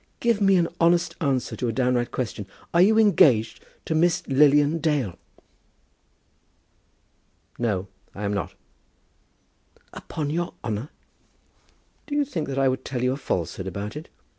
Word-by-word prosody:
Give 235 -3 +1
me 195 -1 +5
an 170 -2 +3
honest 170 +1 +2
answer 135 -5 -1
to 125 - -3
a - - 0
downright 125 0 0
question. 105 -5 -4 0.3
Are 170 - +5
you 215 +4 +5
engaged 150 - +4 0.2
to - - -1
Miss 165 +1 +2
Lilian 145 +3 +4
Dale?" 145 - 0 2.4
"No; 100 -5 -1 0.3
I 105 - -6
am 100 0 -1
not." 100 - -4 1.4
"Upon 150 -2 -5
your 175 +2 -3
honour?" 110 +5 -3 1.2
"Do 290 - -3
you 290 -1 +2
think 170 - -4
that 135 -1 -4
I 135 0 +3
would 130 0 -1
tell 125 -2 -4
you 125 - +2
a - - -1
falsehood 95 - -3
about 100 +5 -5
it? 155 +2 -8
140 Hz, 145 wpm, -24 LUFS, 120-170 Hz, 2.4 s, me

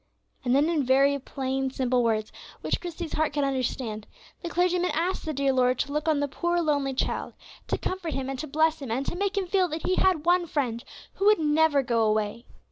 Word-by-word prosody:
And 250 0 +2
then, 290 +3 +4
in 325 -4 +1
very 275 +2 +3
plain, 265 0 -2
simple 255 -1 0
words, 215 -2 0 0.3
which - - -1
Christie's 345 -2 -6
heart 310 -1 0
could 290 -1 0
understand, 255 -5 -2 0.3
the 345 - -4
clergyman 360 +1 +1
asked 345 +4 -1
the 315 - -2
dear 275 -2 +1
Lord 255 -1 +2
to 280 - -2
look 300 +2 -2
on 305 -2 +2
the 285 - 0
poor 345 +5 -1
lonely 285 -5 0
child, - - -2 0.3
to - - 0
comfort 370 -4 -4
him 270 -1 -3
and 270 -1 -4
to 310 - -4
bless 315 +2 +1
him, 270 - -6
and 255 +5 -1
to - - -3
make 400 +2 -1
him 390 - +1
feel 370 0 +2
that 315 -1 -5
he 370 - +1
had 360 -5 +2
one 350 0 +3
Friend 245 -7 -2 0.3
who 395 - -1
would 425 - +6
never 300 -2 +3
go 235 -2 +1
away. 215 +2 0
285 Hz, 220 wpm, -26 LUFS, 260-335 Hz, 0.3 s, would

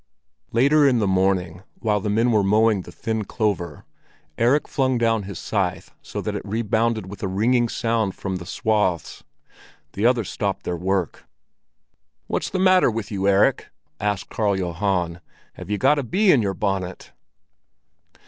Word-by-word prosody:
Later 140 +5 +4
in 130 -3 +3
the 110 - +1
morning, 95 -2 0
while 105 -2 0
the 105 - -3
men 115 +4 +2
were 110 -2 +3
mowing 105 +1 +3
the 85 - -12
thin 110 +4 -3
clover, 95 - -2 0.5
Erik 125 - +2
flung 130 -3 0
down 115 -2 +2
his 100 - -6
scythe 95 -2 -2
so - - -6
that - - -3
it - - -3
rebounded 110 0 0
with 95 +1 -10
a 95 - -1
ringing 115 +5 +1
sound 115 -4 -1
from 95 -2 -4
the 90 - -9
swaths. 105 -7 -1 0.7
The 105 +4 +2
others 120 -5 +1
stopped - - -2
their 90 - -2
work. 90 -1 -2 1.0
"What's - - -2
the 190 - -3
matter 185 -3 +5
with 110 -2 -4
you, 100 -1 -1
Erik?" 100 0 +3 0.3
asked 105 -2 -2
Karl 100 -3 0
Johan. 90 -1 -1 0.3
"Have 90 +1 -10
you 105 - 0
got 150 +9 +3
a - - -2
bee 190 - +3
in 135 - +4
your 100 -2 -1
bonnet?" 95 -2 -3
105 Hz, 165 wpm, -23 LUFS, 95-115 Hz, 1.0 s, matter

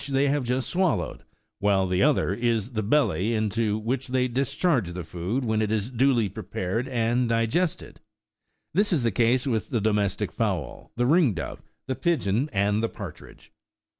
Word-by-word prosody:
they 135 +1 +2
have 145 -1 +1
just 125 +1 -1
swallowed, 185 -1 0 0.4
while 100 -2 +2
the 90 0 0
other 140 -9 +3
is 115 +1 0
the 110 -3 -1
belly, 110 -2 +1
into 110 0 0
which 120 +4 -2
they 130 0 +1
discharge 135 - 0
the 90 0 -5
food 90 - -3
when 110 -1 +1
it 105 -1 0
is 110 +2 -1
duly 125 -3 +3
prepared 100 +3 -3
and 120 -1 +1
digested; 115 +10 -1 0.7
this 205 +5 +2
is 155 -8 +2
the 115 - +2
case 120 +5 +2
with 115 -5 -1
the 120 - 0
domestic 105 -2 0
fowl, - - -3
the 120 - +1
ring 145 - +4
dove, 80 - -5 0.2
the 130 - -2
pigeon, 140 - 0
and 105 0 +1
the 115 - 0
partridge. - - -10
115 Hz, 165 wpm, -26 LUFS, 105-135 Hz, 0.7 s, ring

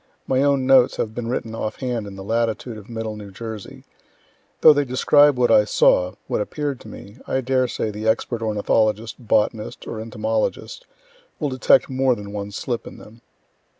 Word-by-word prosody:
My 130 0 +1
own 140 -2 +2
notes 130 -2 +5
have 110 - -3
been 120 0 -5
written 115 -2 -3
off 110 -1 -4
hand 120 -5 -3
in 100 - -9
the 95 - -8
latitude 115 +2 -1
of 105 0 -12
middle 110 -2 -4
New 105 -1 -9
Jersey. 110 +1 -8 0.8
Though 155 - +9
they 145 0 +1
describe 140 +2 +4
what 120 -1 +3
I 105 - +6
saw 90 -3 +3
what - - -1
appear'd 145 +3 -3
to - - -13
me 105 +1 -11
I 130 - 0
dare 130 0 +1
say 110 - -3
the 105 +1 -5
expert 115 +1 0
ornithologist, 110 +1 0
botanist 110 -1 -1
or 110 - -6
entomologist 110 - -3 0.5
will 150 - -1
detect 130 -1 +3
more 130 -1 +1
than 100 -2 -9
one 100 0 -5
slip 120 +3 -4
in - - -10
them.) 115 +2 -15
115 Hz, 185 wpm, -22 LUFS, 105-130 Hz, 0.8 s, Though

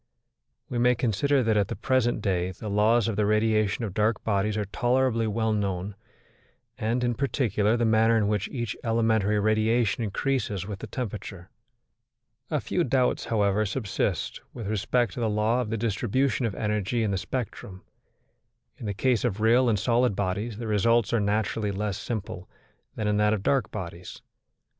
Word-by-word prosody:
We 120 - -3
may 125 +1 +4
consider 130 +4 +1
that 110 -1 +2
at 100 -2 +2
the - - -4
present 120 0 0
day 90 -3 0
the 105 +3 -7
laws 110 +2 +3
of 110 - -1
the 105 - +2
radiation 110 0 +1
of 100 - -5
dark 105 +1 +1
bodies 105 0 0
are 105 - -1
tolerably 120 +3 +1
well 110 +1 0
known, 100 -1 -2 0.8
and, 115 +3 -1
in 120 0 +1
particular, 115 -4 +1
the 120 - +1
manner 110 +1 +4
in 105 -2 +2
which 105 -2 0
each 120 -5 -3
elementary 110 -3 +2
radiation 110 +2 +1
increases 105 -2 -1
with 100 -1 -6
the - - -7
temperature. 100 -6 -6 1.0
A 150 - 0
few 175 +5 -1
doubts, 130 -3 +1
however, 105 -1 +1
subsist 105 0 -2
with 115 - -6
respect 110 +4 0
to - - -6
the 115 -2 0
law 110 +4 +1
of 115 - -4
the 115 - -1
distribution 120 +3 0
of 105 - -5
energy 105 +2 -1
in 105 - 0
the 95 - 0
spectrum. 100 -5 -5 1.0
In 110 - -5
the 100 - -3
case 125 +1 +1
of 110 -4 -1
real 120 +3 +4
and 110 - +2
solid 120 +1 +2
bodies 100 +3 -2
the 115 - -5
results 115 +1 +2
are 115 - +3
naturally 105 +1 0
less 100 0 -3
simple 100 -5 -5 0.5
than 105 - -2
in 105 0 +1
that 105 0 +3
of 100 -3 -2
dark 135 -4 +1
bodies. 85 0 -8
110 Hz, 175 wpm, -26 LUFS, 100-120 Hz, 1.0 s, may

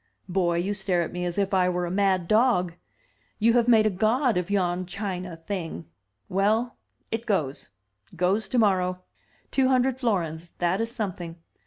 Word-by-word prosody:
Boy, 175 -2 +1
you 190 +4 0
stare 195 -3 0
at - - -5
me 180 0 -3
as 175 +1 -3
if 200 -1 0
I 180 -1 +3
were 180 0 -1
a 175 - -4
mad 190 -2 +1
dog! 215 -6 +3 0.6
You 230 +2 +3
have 240 -1 +3
made 225 -3 +6
a 215 - +3
god 225 +6 +2
of 180 +1 -1
yon 185 -2 0
china 185 -2 -4
thing. 165 - -5 0.4
Well, 215 +6 +1 0.2
— - - -44
it 225 +1 -3
goes: 150 - -1 0.5
goes 185 +5 +1
tomorrow. 185 -6 +2 0.5
Two 265 -1 +3
hundred 260 0 +2
florins, 170 - -2
that 175 +4 +1
is 225 - -1
something. 185 -8 -5
190 Hz, 170 wpm, -26 LUFS, 180-220 Hz, 0.6 s, made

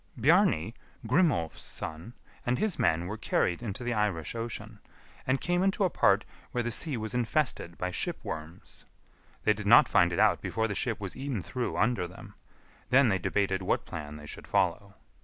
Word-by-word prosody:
Bjarni, 150 - +3 0.3
Grimolf's 125 - +1
son, 80 +9 -6 0.3
and 120 +1 0
his 210 -8 -1
men 85 -7 +2
were 105 +5 -5
carried 90 -4 0
into 115 0 -5
the 120 0 -1
Irish 105 -8 -1
Ocean, 115 -2 -5 0.5
and 130 +1 +2
came 175 0 0
into 195 +1 +1
a 185 - +2
part - - +3 0.2
where 120 - -1
the 120 - -2
sea 145 +3 +2
was 110 -1 -3
infested 120 - -1
by 90 0 -2
ship - - -1
worms. 80 +3 -8 0.6
They 105 - +4
did 105 -1 -6
not - - +8
find - - +4
it - - -2
out - - +4
before 110 0 -1
the 105 - -3
ship 115 +2 -1
was 95 -3 -5
eaten 130 -8 -3
through 125 -2 -3
under 110 -5 +1
them; 90 - -12 0.6
then 130 -1 +5
they 95 -2 +1
debated 95 0 0
what 95 - 0
plan 75 0 -7
they 75 0 -10
should - - -8
follow. 100 +1 0
110 Hz, 185 wpm, -29 LUFS, 90-125 Hz, 0.6 s, not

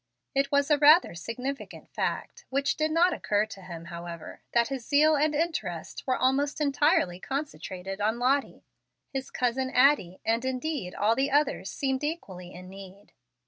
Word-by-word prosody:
It 275 0 +1
was 285 +1 +2
a 295 - +4
rather 305 - +6
significant 250 +10 -6
fact, - - -3
which 275 +1 0
did 310 0 0
not 340 +3 +3
occur 210 -7 0
to 210 -3 -11
him, 170 -2 -9
however, 170 -1 -8
that 235 0 +2
his 270 -3 -4
zeal 305 +4 +4
and 300 +1 +1
interest 215 - -3
were 255 - +2
almost 270 +4 +1
entirely 285 - +2
concentrated 195 -8 -5
on 220 +3 +1
Lottie. 265 +3 0 0.5
His 270 -1 -3
cousin 255 +1 -1
Addie, 255 -9 +3
and 230 +2 +1
indeed 260 - -3
all 215 +2 +3
the 270 +3 +1
others, 280 -8 +1
seemed 265 +3 -2
equally 190 - -5
in 185 +1 -11
need. 195 +1 -12
260 Hz, 160 wpm, -28 LUFS, 195-290 Hz, 0.5 s, rather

